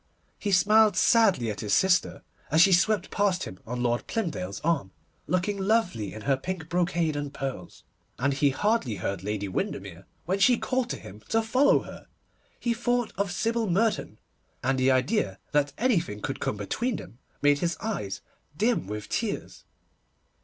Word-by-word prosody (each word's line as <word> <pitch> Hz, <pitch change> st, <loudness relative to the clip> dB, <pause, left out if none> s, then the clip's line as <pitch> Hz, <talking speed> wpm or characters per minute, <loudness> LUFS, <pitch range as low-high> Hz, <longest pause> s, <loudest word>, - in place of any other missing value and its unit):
He 205 Hz, -, -2 dB
smiled 205 Hz, +2 st, +5 dB
sadly 200 Hz, -, +4 dB
at 105 Hz, -, -7 dB
his 105 Hz, -1 st, +1 dB
sister, 180 Hz, -6 st, +2 dB, 0.3 s
as 160 Hz, -, +3 dB
she 190 Hz, +3 st, +7 dB
swept 195 Hz, +2 st, +2 dB
past 195 Hz, -3 st, +1 dB
him 95 Hz, -, -8 dB
on 120 Hz, +1 st, -3 dB
Lord 120 Hz, 0 st, 0 dB
Plymdale's 100 Hz, -, -3 dB
arm, 160 Hz, -, 0 dB, 0.4 s
looking 185 Hz, +4 st, 0 dB
lovely 195 Hz, -, +1 dB
in 110 Hz, -, -8 dB
her 140 Hz, -, +2 dB
pink 165 Hz, +3 st, -5 dB
brocade 170 Hz, -3 st, 0 dB
and 145 Hz, -1 st, -3 dB
pearls, 135 Hz, -10 st, -6 dB, 0.3 s
and 140 Hz, +2 st, +1 dB
he 140 Hz, +1 st, +3 dB
hardly 205 Hz, -, 0 dB
heard 95 Hz, -1 st, -3 dB
Lady 105 Hz, 0 st, -2 dB
Windermere 95 Hz, -, -4 dB, 0.2 s
when 190 Hz, +4 st, 0 dB
she 245 Hz, +4 st, +5 dB
called 255 Hz, 0 st, -1 dB
to -, -, -3 dB
him 95 Hz, +3 st, -11 dB
to 225 Hz, 0 st, +2 dB
follow 255 Hz, +6 st, +3 dB
her. -, -, -11 dB, 0.5 s
He 235 Hz, -, 0 dB
thought 245 Hz, 0 st, -1 dB
of 200 Hz, -1 st, -1 dB
Sybil 225 Hz, +3 st, 0 dB
Merton, 205 Hz, -, 0 dB, 0.5 s
and 130 Hz, +1 st, +1 dB
the 130 Hz, +1 st, +3 dB
idea 130 Hz, -, +1 dB
that 145 Hz, -1 st, +2 dB
anything 180 Hz, -, +1 dB
could -, -, -4 dB
come 105 Hz, -, -2 dB
between 220 Hz, -, -2 dB
them 120 Hz, -, -10 dB, 0.2 s
made 145 Hz, 0 st, +4 dB
his 170 Hz, +1 st, -1 dB
eyes 100 Hz, -, -4 dB, 0.4 s
dim 225 Hz, -, +1 dB
with 105 Hz, +1 st, -5 dB
tears. 215 Hz, -, -3 dB
170 Hz, 165 wpm, -27 LUFS, -, 0.5 s, she